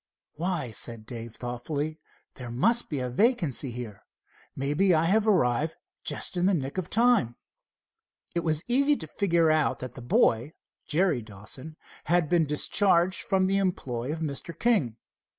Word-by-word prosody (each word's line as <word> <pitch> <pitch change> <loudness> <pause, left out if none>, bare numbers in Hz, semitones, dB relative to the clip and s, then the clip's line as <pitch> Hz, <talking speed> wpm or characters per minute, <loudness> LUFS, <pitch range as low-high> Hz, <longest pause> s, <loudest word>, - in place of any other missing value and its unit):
"Why," 170 -7 -2
said 110 +1 -1
Dave 115 -1 -8
thoughtfully, 145 +6 -4 0.3
"there 125 -2 -8
must 225 - +2
be 150 - -3
a 125 - -2
vacancy 160 - +1
here. 115 -4 -7 0.5
Maybe 150 +7 +2
I 155 - +2
have 210 +6 +2
arrived 155 - +2 0.3
just - - -1
in 180 +1 +2
the 195 - +3
nick 140 +3 -3
of 180 - -5
time." 230 - +3 1.0
It 170 - 0
was 160 -1 0
easy 280 +4 +3
to 160 - -6
figure 170 -1 +2
out 155 -5 +1
that 125 -1 -7
the 130 - -10
boy, 120 +3 +2 0.3
Jerry 165 -5 +1
Dawson, 110 +8 -8 0.3
had 170 -2 +2
been 170 -3 +2
discharged 175 +4 +3
from 190 -1 +2
the 195 +1 +1
employ 135 -10 -2
of 160 +1 -5
Mr. 155 +2 -4
King. 175 - +1
155 Hz, 155 wpm, -27 LUFS, 125-185 Hz, 1.0 s, the